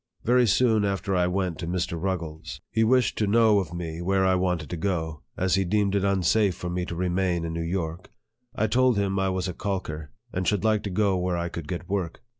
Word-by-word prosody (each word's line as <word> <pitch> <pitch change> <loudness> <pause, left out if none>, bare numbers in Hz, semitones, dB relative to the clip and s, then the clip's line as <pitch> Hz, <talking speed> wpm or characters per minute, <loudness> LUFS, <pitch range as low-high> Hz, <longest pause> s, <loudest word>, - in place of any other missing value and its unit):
Very 125 +1 +4
soon 110 0 +3
after 100 -1 -1
I 90 -1 +2
went 90 -2 -1
to 85 - -4
Mr. 90 0 -1
Ruggles, 85 -3 -4
he 115 0 +2
wished 125 0 +2
110 105 +2 +3
NARRATIVE 110 -3 +5
OF 95 - -5
THE - - -17
to 85 - -6
know 85 - -4
of - - -7
me 85 - -6
where 95 +1 +2
I 95 - +4
wanted 90 -5 -1
to - - -2
go; 80 -4 -2 0.2
as 95 0 +1
he 95 - +3
deemed 100 +1 +1
it 100 -1 +1
unsafe 100 0 +2
for 90 - -5
me 90 0 -2
to 85 - -5
remain 90 -1 0
in 80 - -4
New 85 - -3
York. 85 0 -3 0.4
I 110 - +1
told 125 +1 +3
him 100 -1 0
I 95 0 +1
was 95 0 -1
a 90 - -3
calker, 80 -6 -4 0.2
and 90 0 -2
should 105 -1 +1
like 110 -1 +2
to - - -2
go 100 0 +1
where 90 -1 -1
I 85 0 -2
could 85 -2 -7
get 90 +1 -5
work. 95 -4 -3
95 Hz, 250 wpm, -26 LUFS, 85-100 Hz, 0.4 s, NARRATIVE